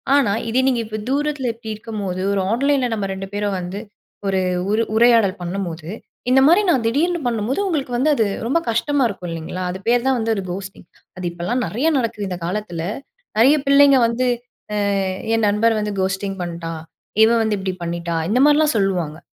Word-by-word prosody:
ஆனா 270 Hz, -8 st, +3 dB, 0.2 s
இதே 255 Hz, +3 st, +2 dB
நீங்க 250 Hz, -3 st, +2 dB
இப்போ 215 Hz, 0 st, -5 dB
தூரத்துல 285 Hz, -2 st, 0 dB
இப்பிடி 225 Hz, -1 st, -7 dB
இருக்கும்போது, 205 Hz, -4 st, -5 dB
ஒரு 195 Hz, -, +1 dB
ஆன்லைன்ல 270 Hz, +2 st, +2 dB
நம்ம 205 Hz, -3 st, -2 dB
2 190 Hz, 0 st, -6 dB
பேரும் 205 Hz, -1 st, -1 dB
வந்து 180 Hz, +3 st, -5 dB, 0.5 s
ஒரு 190 Hz, -1 st, +1 dB, 0.3 s
உரு 225 Hz, +2 st, +2 dB
உரையாடல் 225 Hz, -4 st, +4 dB
பண்ணும்போது, 175 Hz, -3 st, -4 dB, 0.4 s
இந்த 265 Hz, -, +6 dB
மாதிரி 355 Hz, +6 st, +6 dB
நான் 255 Hz, -7 st, +1 dB
திடீர்னு 335 Hz, +8 st, +1 dB
பண்ணும்போது, 230 Hz, -, -1 dB
உங்களுக்கு 280 Hz, -8 st, -2 dB
வந்து 300 Hz, +5 st, +3 dB
அது 225 Hz, -, +2 dB, 0.2 s
ரொம்ப 335 Hz, +7 st, +2 dB
கஷ்டமா 270 Hz, +3 st, +1 dB
இருக்கும், 180 Hz, -3 st, -6 dB
இல்லீங்களா! 165 Hz, +3 st, -5 dB
அது 190 Hz, -, -6 dB
பேரு 240 Hz, 0 st, +4 dB
தான் 265 Hz, -2 st, +3 dB
வந்து 225 Hz, 0 st, 0 dB
ஒரு 195 Hz, -, -3 dB
கோஸ்ட்டிங். 190 Hz, -1 st, -8 dB, 0.3 s
அது 180 Hz, -, -5 dB
இப்பல்லாம் 180 Hz, +9 st, -2 dB
நெறையா 275 Hz, +10 st, 0 dB
நடக்குது 230 Hz, -4 st, -2 dB
இந்த 180 Hz, -, -4 dB
காலத்துல. 175 Hz, -3 st, -3 dB, 0.6 s
நெறைய 270 Hz, +7 st, +6 dB
பிள்ளைங்க 280 Hz, -1 st, +6 dB
வந்து, 245 Hz, +2 st, 0 dB, 0.5 s
அ -, -, -1 dB, 0.6 s
"என் 220 Hz, -2 st, +2 dB
நண்பர் 220 Hz, +2 st, +2 dB
வந்து 210 Hz, -1 st, -3 dB
கோஸ்ட்டிங் 195 Hz, +1 st, -2 dB
பண்ணிட்டான். 165 Hz, -2 st, -5 dB, 0.4 s
இவ 225 Hz, -, +4 dB
வந்து 215 Hz, -2 st, 0 dB
இப்பிடி 190 Hz, -1 st, -3 dB
பண்ணிட்டா" 170 Hz, 0 st, -3 dB
இந்த 245 Hz, -, +2 dB
மாரிலாம் 300 Hz, -1 st, +4 dB
சொல்வாங்க. 180 Hz, -6 st, 0 dB
215 Hz, 175 wpm, -20 LUFS, 190-255 Hz, 0.6 s, இந்த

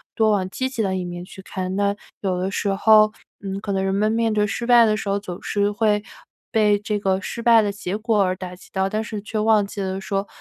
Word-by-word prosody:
多 220 Hz, -1 st, +3 dB
往 190 Hz, -3 st, 0 dB
积 260 Hz, +7 st, -2 dB
极 260 Hz, -3 st, -3 dB
的 190 Hz, -2 st, 0 dB
一 180 Hz, -, -3 dB
面 175 Hz, 0 st, -6 dB
去 190 Hz, +1 st, -11 dB
看。 185 Hz, -1 st, -4 dB
那 200 Hz, 0 st, +1 dB, 0.2 s
有 185 Hz, -3 st, -1 dB
的 185 Hz, +2 st, -2 dB
时 205 Hz, -, -2 dB
候， 215 Hz, +1 st, +6 dB, 0.3 s
嗯， 195 Hz, -1 st, -5 dB
可 205 Hz, -, -4 dB
能 195 Hz, -1 st, 0 dB
人 195 Hz, 0 st, 0 dB
们 215 Hz, +2 st, +1 dB, 0.3 s
失 220 Hz, +3 st, -3 dB
败 240 Hz, -1 st, +7 dB
的 215 Hz, -1 st, +2 dB
时 215 Hz, -, -5 dB
候 200 Hz, 0 st, +1 dB
总 185 Hz, -3 st, -7 dB
是 205 Hz, 0 st, 0 dB
会 210 Hz, 0 st, +1 dB, 0.5 s
被 210 Hz, -2 st, +3 dB
这 210 Hz, 0 st, -2 dB
个 195 Hz, -1 st, 0 dB
失 235 Hz, -, -5 dB
败 230 Hz, -1 st, +6 dB
的 205 Hz, -1 st, -1 dB
结 200 Hz, -2 st, -4 dB
果 215 Hz, -1 st, +1 dB
而 185 Hz, -1 st, 0 dB
打 185 Hz, -1 st, -7 dB
击 180 Hz, -, -17 dB
到， 190 Hz, 0 st, 0 dB
但 215 Hz, +2 st, -2 dB
是 215 Hz, -2 st, -6 dB
却 215 Hz, +2 st, -5 dB
忘 215 Hz, -1 st, +3 dB
记 200 Hz, -, -6 dB
了 190 Hz, 0 st, -3 dB
说， 195 Hz, +1 st, -2 dB
205 Hz, 265 characters per minute, -22 LUFS, 190-215 Hz, 0.5 s, 败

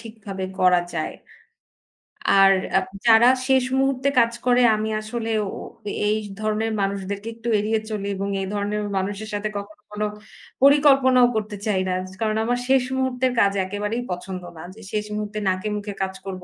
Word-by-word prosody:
ঠিকভাবে 215 Hz, -4 st, -7 dB, 0.2 s
করা 180 Hz, -1 st, +5 dB
যায়। -, -, -3 dB, 1.3 s
আর 195 Hz, 0 st, +7 dB, 0.2 s
অ্যা 190 Hz, -, +3 dB, 0.2 s
যারা 230 Hz, +2 st, +7 dB, 0.2 s
শেষ 265 Hz, -1 st, +4 dB, 0.2 s
মুহূর্তে 270 Hz, 0 st, +1 dB
কাজ 235 Hz, 0 st, +4 dB
করে 250 Hz, 0 st, +4 dB
আমি 215 Hz, +1 st, -2 dB
আসলে 225 Hz, +1 st, -4 dB, 0.2 s
ও -, -, -4 dB, 0.6 s
এই 215 Hz, -, +2 dB, 0.2 s
ধরনের 215 Hz, +1 st, -1 dB
মানুষদেরকে 200 Hz, +2 st, -3 dB
একটু 230 Hz, +1 st, -8 dB
এড়িয়ে 215 Hz, +1 st, 0 dB
চলি 205 Hz, -2 st, -3 dB
এবং 195 Hz, +1 st, -3 dB
এই 190 Hz, -, -3 dB
ধরনের 205 Hz, +1 st, -1 dB, 0.2 s
মানুষের 205 Hz, +3 st, -3 dB
সাথে 205 Hz, +1 st, -2 dB
কখনো 210 Hz, +1 st, -9 dB
কোনো 210 Hz, 0 st, -2 dB, 0.6 s
পরিকল্পনাও 275 Hz, -3 st, +6 dB
করতে 210 Hz, -1 st, -2 dB
চাই 195 Hz, -3 st, +1 dB
না। 185 Hz, -, 0 dB, 0.3 s
কারণ 215 Hz, -1 st, +1 dB
আমার 245 Hz, +2 st, 0 dB
শেষ 265 Hz, -1 st, +4 dB
মুহূর্তের 260 Hz, -1 st, 0 dB
কাজ 200 Hz, -2 st, +4 dB
একেবারেই 210 Hz, +5 st, -3 dB
পছন্দ 180 Hz, +1 st, -5 dB, 0.2 s
না। -, -, -8 dB
যে 225 Hz, -, -14 dB
শেষ 210 Hz, 0 st, -1 dB
মুহূর্তে 210 Hz, 0 st, -4 dB
নাকে 185 Hz, +3 st, -1 dB
মুখে 205 Hz, 0 st, -5 dB
কাজ 190 Hz, 0 st, -1 dB
করব। 185 Hz, -2 st, -6 dB
215 Hz, 165 wpm, -23 LUFS, 200-235 Hz, 1.3 s, আর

